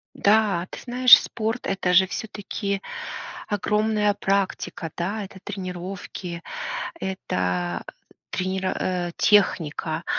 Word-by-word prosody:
Да, 200 -4 +3
ты - - -8
знаешь, 250 0 +8
спорт- 225 +2 -3
это 190 -2 0
же 190 +1 +7
всё-таки 200 -1 -4 0.7
огромная 210 +1 +1
практика, 195 -4 -1
да, 200 +5 -2
это 190 0 -10
тренировки, 185 -2 -6 0.6
это 90 - -2 0.5
тренеро 185 0 -1
э, 175 -2 -1
техника, 165 -5 +2
190 Hz, 95 wpm, -24 LUFS, 175-210 Hz, 0.7 s, знаешь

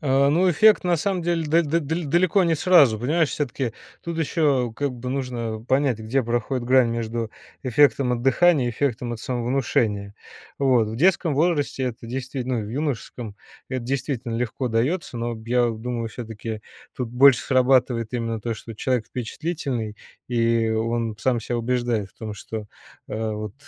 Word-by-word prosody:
А, 140 -1 +3
ну, 180 +4 +3
эффект 210 +5 +5
на 175 -1 +3
самом 185 +1 -1
деле 170 -1 0
да 165 +3 +4
да 165 +2 0
даль 160 +3 -2
далеко 180 +4 +3
не 165 -1 +2
сразу. 140 - +5
Понимаешь, 155 +5 +1
всё-таки 130 -4 -2 0.3
тут 170 -1 -4
ещё, 140 -7 +1
как 140 +2 -2
бы, 125 +1 -6
нужно 120 -4 -3
понять, 130 -3 +2
где 115 +5 0
проходит 120 +2 -1
грань 130 -1 +4
между 115 -1 -3 0.3
эффектом 135 0 +3
от 120 -1 -2
дыхания 140 +1 +4
и - - -1
эффектом 120 -1 -2
от 115 - -6
самовнушения. 120 -5 -1 0.4
Вот. 125 -6 +3
В 110 - -5
детском 170 0 +3
возрасте- 150 -3 +1
это 120 -1 -5
действительно 130 -1 -3
ну, 105 - -5
в - - -8
юношеском, 125 -6 -4 0.3
это 130 -1 -3
действительно 130 -2 -2
легко 125 +2 -2
даётся. 125 +5 -1
Но 120 0 -2
я 120 0 +3
думаю, 115 +1 -4
всё-таки 110 -1 -6 0.4
тут 125 -2 -3
больше 130 +1 +6
срабатывает 125 -3 +2
именно 115 -2 -2
то, 115 +1 -2
что 115 +1 -9
человек 125 +1 -1
впечатлительный, 125 -4 -4 0.3
и 115 -2 +2
он 115 0 -1
сам 125 -1 +1
ся 120 +2 -3
убеждает 120 -4 -1
в - - -34
том, 110 -2 -5
что, 105 +1 -7 0.4
э, 110 0 -2
вот, 105 -1 -5
125 Hz, 165 wpm, -23 LUFS, 115-140 Hz, 0.4 s, больше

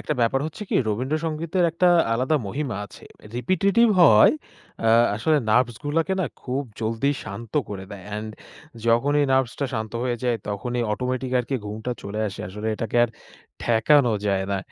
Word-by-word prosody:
একটা 150 - -2
ব্যাপার 120 +3 +2
হচ্ছে 160 +6 -7
কি - - -2
রবীন্দ্র 130 +8 -1
সঙ্গীতের 165 +3 -1
একটা 170 +2 +1 0.3
আলাদা 130 +6 +1
মহিমা 135 +1 -3
আছে। - - -15 0.3
রিপিটিটিভ 195 - +3
হওয়ায় 110 -10 +7 0.5
আ - - +5 0.3
আসলে 155 +8 +2
নার্ভস 120 +1 +2
গুলোকে 165 +5 0
না 180 - 0 0.2
খুব 135 +2 -2 0.2
জলদি 115 +5 0
শান্ত 110 +3 -8 0.2
করে 95 -2 -6
দেয় 100 -3 -9
অ্যান্ড 105 +1 -5 0.6
যখনই 145 +5 +3
নার্ভসটা 130 +1 +1
শান্ত 110 0 -4
হয়ে 125 -1 -1
যায় 120 -2 +1
তখনই 120 +5 -2
অটোমেটিক 130 +2 -2
আরকি 125 +2 -2
ঘুমটা 110 +4 -5
চলে 100 +2 -5
আসে। 95 - -8
আসলে 105 +3 -6
এটাকে 115 +1 -3
আর - - -3 0.5
ঠেকানো 120 +2 +4
যায় 95 -1 +1
না, 100 - 0
125 Hz, 165 wpm, -24 LUFS, 110-145 Hz, 0.6 s, হওয়ায়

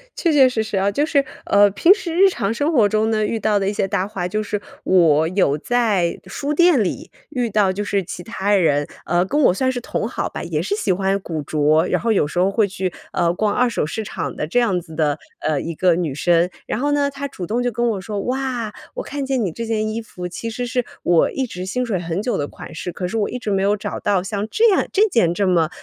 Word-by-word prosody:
确 335 - +1
确 265 -3 +6
实 225 -3 -1
实 215 -2 -3
啊。 195 +1 +2
就 290 +9 +1
是， 290 -3 +2 0.2
呃， 205 0 +5
平 335 - +6
时 355 -5 -5
日 385 +3 +6
常 200 - -2
生 290 +7 0
活 220 -7 +4
中 215 +1 +1
呢， 215 -1 +1
遇 225 - -2
到 215 -1 +2
的 195 0 0
一 210 - -2
些 195 - 0
搭 185 0 -1
话， 185 -4 -3
就 215 +4 -2
是 210 -1 -3 0.2
我 160 -4 +4
有 180 -6 +2
在 210 -6 +1
书 280 +10 -3
店 345 -8 +5
里 185 - -4 0.2
遇 250 -5 -1
到 200 -2 +2
就 200 +2 -3
是 200 -1 0
其 175 +1 -7
他 205 -3 -1
人， 145 -6 +2 0.2
呃， 175 +1 +2
跟 290 +10 0
我 - - +5
算 260 +7 +1
是 250 - -3
同 - - -3
好 - - -2
吧， - - -6
也 - - -2
是 405 - -1
喜 215 - 0
欢 195 +1 +1
古 165 -5 -4
着， 155 +2 +2
然 - - 0
后 230 0 +1
有 195 - +3
时 175 - -3
候 185 +2 +3
会 210 0 +2
去， 190 -1 -3 0.2
呃， 170 0 +2
逛 205 +3 0
二 250 0 +2
手 220 - -1
市 220 +8 -4
场 - - -5
的 150 - -3
这 215 +10 +2
样 200 -7 +2
子 160 -2 -12
的， 150 -2 +1 0.2
呃， 155 -2 0
一 170 - -4
个 180 +1 +3
女 165 -5 -2
生。 175 +3 +2 0.2
然 - - -3
后 290 +3 0
呢， 285 -1 +2
她 280 +1 -5
主 190 -10 -7
动 230 +6 -1
就 245 - 0
跟 235 +1 0
我 205 -4 -2
说： 205 +2 -4
“哇， 250 -4 -2 0.2
我 - - -3
看 285 - -4
见 265 -4 0
你 180 - -2
这 230 +8 -5
件 215 -1 0
衣 220 +1 -3
服 180 -5 -7
其 205 +6 -5
实 245 +2 -4
是 250 0 -1 0.2
我 175 -2 +3
一 265 - -2
直 180 -7 -7
心 250 +5 -1
水 200 -7 -1
很 170 +2 -3
久 245 - -1
的 145 - -1
款 160 - -11
式， 180 - -5
可 180 +1 -4
是 225 +5 -3
我 205 - 0
一 250 - -4
直 220 -4 -4
没 195 -1 +1
有 205 +2 +2
找 205 0 -5
到 195 -3 +1
像 205 +1 -3
这 460 - +3
样 380 - +2
这 420 +2 +4
件 205 - +3
这 200 0 +1
么 170 -4 +3
205 Hz, 285 characters per minute, -20 LUFS, 180-245 Hz, 0.2 s, 确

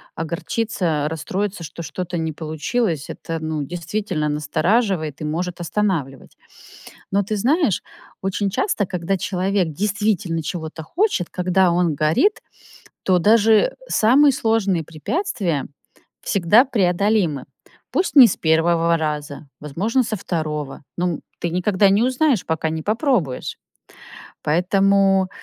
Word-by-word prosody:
огорчиться, 165 -1 -2
расстроиться, 185 +4 -3
что 170 - -8
что-то 180 +1 -5
не 160 -1 -2
получилось- 160 - -2
это, 165 0 -5
ну, 155 -1 -3
действительно 175 +1 -3
настораживает 155 - 0
и - - -3
может 170 +3 -3
останавливать. 170 -8 -2 0.8
Но 200 +1 +2
ты 210 +2 -3
знаешь, 265 - +2 0.4
очень 195 +1 -1
часто, 210 - 0
когда 180 +1 -2
человек 185 0 0
действительно 190 -1 -1
чего-то 160 -1 -5
хочет, 340 - 0
когда 180 0 +2
он 170 -3 +1
горит, 155 - +2 0.6
то 185 -1 +3
даже 220 - +4
самые 275 +6 +5
сложные 220 -8 0
препятствия 185 - -2 0.6
всегда 200 +5 +4
преодолимы. 195 - +1 0.5
Пусть 370 - 0
не 255 -3 +11
с 195 - -1
1 165 +1 +2
раза, 150 -2 -4
возможно 195 - 0
со 220 -2 -3
2, 150 -6 -4 0.2
но, 175 - 0
м, - - -10 0.2
ты 170 - -2
никогда 185 +3 +2
не 200 +4 +3
узнаешь, 255 -2 +1
пока 160 0 -1
не 160 0 -3
попробуешь. 215 - -1 0.9
Поэтому, 195 +3 +3
180 Hz, 120 wpm, -21 LUFS, 160-210 Hz, 0.9 s, не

